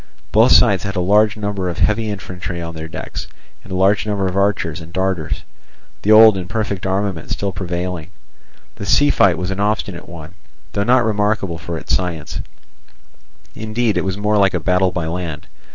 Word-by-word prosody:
Both - - +5
sides 95 -3 +5
had 100 0 -4
a - - 0
large 105 +4 +3
number 100 -3 -2
of 85 - -5
heavy 110 +1 +1
infantry 90 -3 -5
on 85 -1 -5
their 80 0 -7
decks, 80 - -7 0.4
and - - -14
a - - -2
large 100 +3 +2
number 100 -2 0
of 90 - -3
archers 100 -5 0
and 80 +1 -11
darters, 95 -4 -2 0.6
the 105 - +2
old 110 -1 +8
imperfect 100 +1 -3
armament 95 -4 -2
still 100 -1 -2
prevailing. 90 -2 -4 0.7
The 100 - -6
sea 145 0 +4
fight 90 -3 +4
was 90 +1 -3
an 95 - -4
obstinate 100 -4 -2
one, 85 -1 -10 0.4
though 100 - 0
not 125 +1 +3
remarkable 105 -5 0
for 85 -1 -5
its - - 0
science; 85 -5 -4 1.1
indeed 110 0 -1
it - - 0
was 95 0 -2
more 105 +1 +1
like 100 -1 +3
a - - 0
battle 90 +2 +2
by 85 -2 -3
land. 80 -2 -4
95 Hz, 185 wpm, -19 LUFS, 90-105 Hz, 1.1 s, old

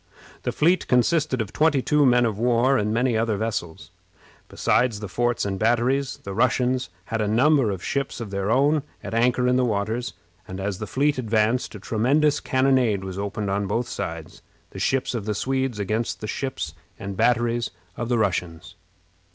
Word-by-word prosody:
The - - -2
fleet 175 +4 +2
consisted 130 +1 +2
of 105 - -5
twenty 150 -4 +2
two 150 -2 +3
men 125 -1 +4
of 110 -3 -2
war, 120 +3 +3
and 105 -4 0
many 120 +1 +1
other 110 -1 0
vessels. 100 -7 -4 0.6
Besides 120 -4 +1
the 105 - -5
forts 120 +4 0
and 95 -1 -3
batteries, 125 +5 +1
the 100 - -6
Russians 125 0 +1 0.2
had 110 - 0
a 105 - 0
number 130 +3 +3
of 95 -3 -4
ships 140 -2 -2
of 115 -4 -6
their 100 0 -2
own 145 +5 +3 0.2
at - - -6
anchor 125 +2 +2
in 125 0 +3
the 130 - +2
waters, 110 +2 -1 0.3
and 95 0 -7
as 95 -1 -3
the 110 - -5
fleet 140 +4 +1
advanced 115 +1 0
a - - -7
tremendous 140 +9 +2
cannonade 130 -6 +2
was 95 0 -6
opened 100 0 -3
on 100 0 -1
both 115 +5 -1
sides, - - -6 0.3
the - - -8
ships 130 -1 0
of 115 -4 -3
the 105 -1 -1
Swedes 130 0 -1
against 110 +3 -2
the - - -6
ships 95 - -4 0.2
and 100 0 -6
batteries 120 +1 +1 0.3
of 120 - -4
the 120 - +2
Russians. 90 -4 -2
115 Hz, 185 wpm, -24 LUFS, 105-130 Hz, 0.6 s, men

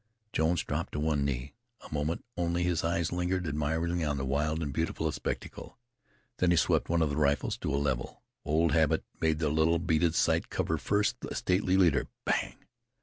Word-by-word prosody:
Jones 80 +2 +1
dropped - - -3
on 75 - -1
one 75 -3 +1
knee. 70 0 -3 0.3
A - - -10
moment 75 +3 -2
only 85 0 0
his 85 -2 0
eyes 85 0 0
lingered 90 +1 -1
admiringly 80 +3 -1
on 75 -2 0
the 65 - -2
wild 75 +4 0
and 70 -2 -3
beautiful 80 +3 -1
spectacle; - - -5 0.6
then 90 - +2
he 85 - +4
swept - - +2
one 85 -1 +3
of 75 - 0
the 70 - -2
rifles 70 -1 +1
to - - -3
a 70 - +1
level. 70 -4 -2 0.2
Old 80 +2 +2
habit 80 +1 +2 0.2
made 80 -1 +2
the 80 -2 0
little 80 +2 +3
beaded 85 0 +1
sight - - +2
cover - - -1
first 105 +1 +1
the - - -6
stately 95 0 +1
leader. 90 -4 +3 0.2
Bang! - - 0
80 Hz, 190 wpm, -30 LUFS, 75-85 Hz, 0.6 s, he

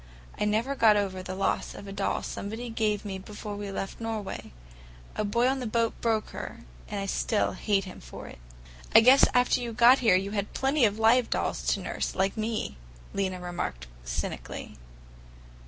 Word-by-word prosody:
I - - +1
never 220 +6 +1
got 220 -6 +5
over 190 -2 -1
the 185 0 -6
loss 195 - -1
of - - -9
a 195 - -7
doll 195 0 -1
somebody 225 +4 -5
gave 215 -2 0
me 190 -2 -4
before 205 +1 -7
we 205 0 -5
left 195 +2 -5
Norway. 220 -3 -4 0.6
A - - 0
boy 235 +4 +2
on 265 +1 +1
the 250 - -3
boat 230 +1 +1
broke 225 -2 +1
her, - - -7 0.3
and 205 - -3
I 195 - -2
still 205 +2 +1
hate 200 -2 0
him 185 -1 -9
for - - -9
it." - - -12 0.6
"I 225 - +11
guess 255 +4 +8
after 250 0 +3
you 235 -1 -4
got 240 +4 +7
here 225 -7 +5
you 195 +2 0
had 205 -1 -3
plenty 270 -1 +3
of 205 -1 +1
live 230 +2 +4
dolls - - -1
to - - -5
nurse, - - -3
like 195 +1 +1
me!" 215 - -2 0.4
Lena 190 -2 -1
remarked 175 - -4 0.2
cynically. - - -5
210 Hz, 190 wpm, -28 LUFS, 195-230 Hz, 0.6 s, I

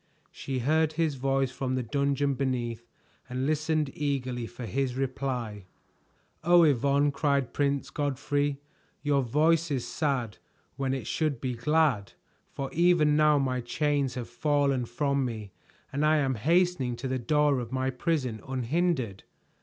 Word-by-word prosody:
She 135 -1 -4
heard 155 +5 +2
his 160 -1 +1
voice 135 0 0
from 130 0 -2
the 130 - -1
dungeon 140 +2 0
beneath 120 -3 -2 0.4
and 130 +1 -2
listened 155 -1 0
eagerly 130 -5 -2
for 120 +1 -8
his 125 +3 -1
reply. 125 -6 -3 0.8
"Oh, 175 +1 +6
Yvonne," 140 0 +3
cried 140 -3 0
Prince 140 -1 0
Godfrey, 145 0 -1 0.4
"your 145 -2 +2
voice 155 +6 +2
is 135 -4 -1
sad 135 -8 -2 0.4
when 135 -1 -1
it 130 -5 -5
should 150 -2 -1
be 130 0 -2
glad. 125 -4 +1 0.4
For 135 -1 -5
even 170 -3 +4
now 150 -1 +5
my 130 -2 0
chains 140 +1 0
have 120 -2 -4
fallen 140 0 +1
from 140 +3 0
me 110 -5 -5 0.4
and 145 +2 0
I 155 +1 +4
am 135 -3 +1
hastening 160 - +1
to 120 +3 -5
the 130 0 -1
door 145 +2 +2
of 120 -1 -6
my 130 0 0
prison 130 - -1
unhindered." 130 - -1
135 Hz, 145 wpm, -28 LUFS, 125-150 Hz, 0.8 s, Oh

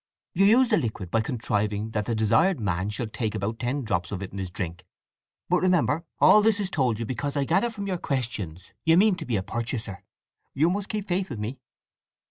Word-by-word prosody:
You 195 +3 +4
use 245 +3 +5
the - - +4
liquid 110 - -3
by 115 - +2
contriving 105 -2 -1
that 105 -2 -2
the 115 - 0
desired 155 - +3
man 95 -2 -1
shall 105 +3 -3
take 110 0 -3
about 110 +2 -3
ten 130 +3 -1
drops 90 -6 -2
of 100 -1 -4
it 95 - -7
in 100 - -6
his 95 -2 -3
drink. 90 -1 -5 0.6
But 180 +1 +2
remember, 170 -3 +2
all 215 - +7
this 215 -1 +3
is 195 -2 -2
told 125 -7 +1
you 115 - -3
because 140 +5 -3
I 140 - +2
gather 190 - +2
from 210 -3 -6
your 185 -3 -2
questions 105 - -4
that - - -32
you 165 +1 +5
mean 210 +2 +5
to 160 - -6
be 120 - 0
a 95 - 0
purchaser. 110 -1 -4 0.5
You 160 +5 +3
must 200 +1 -3
keep 210 -1 -3
faith 185 +1 -1
with 120 - -5
me?" 110 +6 -5
120 Hz, 225 wpm, -26 LUFS, 105-175 Hz, 0.6 s, all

